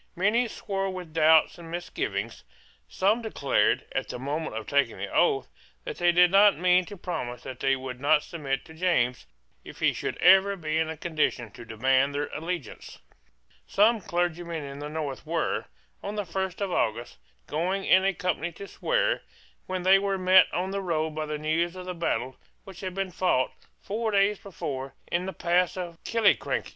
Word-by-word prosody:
Many 215 Hz, +7 st, +2 dB
swore 195 Hz, -3 st, -3 dB
with 180 Hz, -4 st, -7 dB
doubts 160 Hz, +1 st, +4 dB
and 165 Hz, -1 st, -10 dB
misgivings, 115 Hz, -, -4 dB, 0.5 s
Some 210 Hz, +5 st, +1 dB
declared, 140 Hz, -, +1 dB
at -, -, -3 dB
the -, -, -4 dB
moment 145 Hz, +1 st, -3 dB
of 110 Hz, -, -5 dB
taking 140 Hz, -5 st, +1 dB
the -, -, -6 dB
oath, -, -, +2 dB, 0.4 s
that -, -, -6 dB
they 175 Hz, 0 st, +4 dB
did 175 Hz, 0 st, +5 dB
not 200 Hz, +1 st, +6 dB
mean 180 Hz, +1 st, +3 dB
to 205 Hz, +1 st, -10 dB
promise 125 Hz, -10 st, -5 dB
that 130 Hz, -, -8 dB
they 135 Hz, 0 st, +2 dB
would 130 Hz, -1 st, -7 dB
not 150 Hz, +1 st, +4 dB
submit 140 Hz, -5 st, -4 dB
to 160 Hz, -, -13 dB
James, 125 Hz, -, 0 dB, 0.4 s
if -, -, -12 dB
he -, -, +3 dB
should -, -, -4 dB
ever 190 Hz, +2 st, +6 dB
be 160 Hz, -3 st, -2 dB
in 160 Hz, 0 st, 0 dB
a 160 Hz, -, -5 dB
condition 150 Hz, -8 st, -1 dB
to 120 Hz, -, -11 dB
demand 130 Hz, +5 st, +1 dB
their 145 Hz, 0 st, -2 dB
allegiance, 165 Hz, -6 st, -5 dB, 0.7 s
Some 220 Hz, +2 st, +3 dB
clergymen 175 Hz, -2 st, -2 dB
in 140 Hz, 0 st, -8 dB
the 145 Hz, +1 st, -5 dB
north 150 Hz, -3 st, -4 dB
were, 165 Hz, +1 st, -1 dB, 0.4 s
on 205 Hz, +1 st, -5 dB
the 205 Hz, -1 st, -2 dB
first 190 Hz, +2 st, -3 dB
of 195 Hz, -2 st, -1 dB
August, 115 Hz, -, -1 dB, 0.3 s
going 180 Hz, +6 st, -1 dB
in 190 Hz, 0 st, +5 dB
a 195 Hz, -, +3 dB
company 180 Hz, -2 st, -2 dB
to 200 Hz, +4 st, -9 dB
swear, -, -, 0 dB, 0.5 s
when 185 Hz, -1 st, -3 dB
they 190 Hz, +1 st, +6 dB
were 195 Hz, -1 st, -1 dB
met 185 Hz, 0 st, +5 dB
on 185 Hz, +2 st, -2 dB
the 200 Hz, 0 st, -2 dB
road 160 Hz, -4 st, -1 dB
by 155 Hz, 0 st, -4 dB
the 150 Hz, 0 st, -3 dB
news 160 Hz, +3 st, 0 dB
of 185 Hz, -1 st, -8 dB
the 180 Hz, -, -4 dB
battle 130 Hz, -6 st, -2 dB, 0.3 s
which 190 Hz, -3 st, -12 dB
had 185 Hz, -2 st, -5 dB
been 195 Hz, -1 st, -2 dB
fought, 175 Hz, -8 st, +1 dB, 0.3 s
four 220 Hz, +2 st, -2 dB
days 200 Hz, 0 st, +2 dB
before, 135 Hz, -8 st, -6 dB, 0.2 s
in 180 Hz, +2 st, 0 dB
the -, -, -2 dB
pass 175 Hz, 0 st, +1 dB
of 170 Hz, -2 st, -6 dB
Killiecrankie. 230 Hz, -2 st, +1 dB
175 Hz, 185 wpm, -27 LUFS, 145-190 Hz, 0.7 s, not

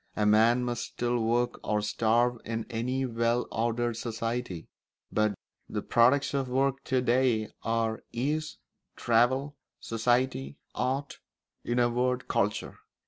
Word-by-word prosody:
A 105 Hz, -, +1 dB
man 115 Hz, +4 st, +4 dB
must 120 Hz, -1 st, -2 dB
still 120 Hz, 0 st, -1 dB
work 120 Hz, +2 st, 0 dB
or 105 Hz, -1 st, 0 dB
starve 115 Hz, +3 st, +2 dB
in 115 Hz, 0 st, -3 dB
any 125 Hz, +4 st, -1 dB
well 115 Hz, 0 st, 0 dB
ordered 120 Hz, 0 st, 0 dB
society; 115 Hz, -5 st, -3 dB, 0.4 s
but 105 Hz, -1 st, +1 dB, 0.3 s
the -, -, -3 dB
products 130 Hz, +5 st, +3 dB
of 135 Hz, -2 st, -1 dB
work 135 Hz, +1 st, +1 dB
to 130 Hz, -2 st, +1 dB
day 120 Hz, -3 st, +2 dB
are 115 Hz, -1 st, -1 dB
ease, 150 Hz, +6 st, -2 dB, 0.4 s
travel, 130 Hz, +5 st, +2 dB, 0.2 s
society, 115 Hz, -, 0 dB, 0.2 s
art, 135 Hz, +2 st, -2 dB, 0.4 s
in 120 Hz, -, -1 dB
a 120 Hz, -1 st, +4 dB
word, 125 Hz, +1 st, 0 dB
culture. 105 Hz, +1 st, -1 dB
120 Hz, 130 wpm, -29 LUFS, 115-125 Hz, 0.4 s, man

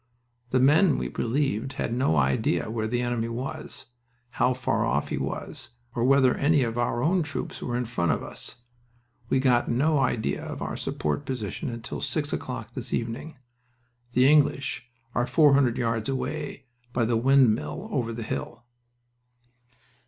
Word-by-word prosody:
"The 130 Hz, -, +2 dB
men 150 Hz, +6 st, +5 dB
we -, -, -2 dB
relieved 130 Hz, 0 st, -1 dB
had 120 Hz, -, -2 dB
no 125 Hz, -9 st, +2 dB
idea 70 Hz, +9 st, +1 dB
where 110 Hz, -1 st, -1 dB
the 120 Hz, +2 st, 0 dB
enemy 120 Hz, -2 st, -1 dB
was, 125 Hz, +4 st, -5 dB, 0.5 s
how 125 Hz, 0 st, +2 dB
far 130 Hz, -, 0 dB
off -, -, 0 dB
he -, -, -2 dB
was, -, -, -5 dB, 0.2 s
or 120 Hz, -, -1 dB
whether 130 Hz, 0 st, +5 dB
any 145 Hz, -1 st, +3 dB
of 115 Hz, -1 st, -2 dB
our 120 Hz, 0 st, 0 dB
own 180 Hz, +3 st, +3 dB
troops 150 Hz, -2 st, -4 dB
were 120 Hz, 0 st, -2 dB
in 125 Hz, -, -1 dB
front 100 Hz, -8 st, 0 dB
of -, -, -1 dB
us. 120 Hz, -, -7 dB, 0.7 s
We -, -, +3 dB
got 125 Hz, -2 st, +3 dB
no 145 Hz, +5 st, +2 dB
idea 125 Hz, -4 st, 0 dB
of -, -, -6 dB
our -, -, -3 dB
support 75 Hz, -, -2 dB
position 130 Hz, -, -4 dB
until 115 Hz, -1 st, -6 dB
six -, -, -2 dB
o'clock -, -, -4 dB
this -, -, -7 dB
evening. 120 Hz, +7 st, -3 dB, 0.8 s
The 125 Hz, +2 st, +5 dB
English 140 Hz, -4 st, +2 dB, 0.2 s
are 120 Hz, +1 st, +1 dB
four 150 Hz, -2 st, +5 dB
hundred 130 Hz, -4 st, +3 dB
yards 115 Hz, -1 st, -1 dB
away, 140 Hz, +1 st, -3 dB, 0.3 s
by 120 Hz, -2 st, +2 dB
the 115 Hz, +1 st, +1 dB
windmill 135 Hz, -, +3 dB
over 120 Hz, -, -1 dB
the 115 Hz, 0 st, -5 dB
hill." 115 Hz, +1 st, -5 dB
125 Hz, 160 wpm, -26 LUFS, 115-140 Hz, 0.8 s, men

